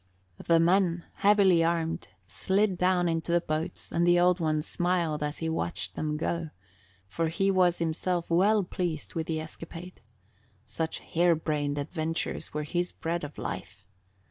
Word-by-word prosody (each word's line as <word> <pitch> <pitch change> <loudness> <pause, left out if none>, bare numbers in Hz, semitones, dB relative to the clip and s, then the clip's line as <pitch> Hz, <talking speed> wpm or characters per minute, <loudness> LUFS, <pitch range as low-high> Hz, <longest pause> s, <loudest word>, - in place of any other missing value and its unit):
The 165 -1 +4
men 175 0 +2
heavily 195 -4 +5
armed 165 -1 -1 0.2
slid 190 - +1
down 180 0 +2
into 165 0 -1
the 175 - +4
boats 160 +1 -4
and 170 +1 +2
the 175 0 +5
Old 180 +1 +4
One 155 -2 0
smiled 175 -3 0
as 150 0 -2
he 165 - -3
watched 165 +1 -2
them 150 -1 -2
go, 165 +1 -2 0.6
for 135 - -1
he 195 +5 +1
was 180 -2 +3
himself 170 +1 -1
well 200 +5 +4
pleased 175 -4 -4
with 160 -1 -3
the 160 -1 -1
escapade. 165 +3 -9 0.6
Such 160 +9 -4
harebrained 155 -4 +1
adventures 160 +2 -3
were 150 0 -3
his 175 +4 -1
bread 170 0 -3
of 145 0 -7
life. - - -6
170 Hz, 150 wpm, -28 LUFS, 160-180 Hz, 0.6 s, heavily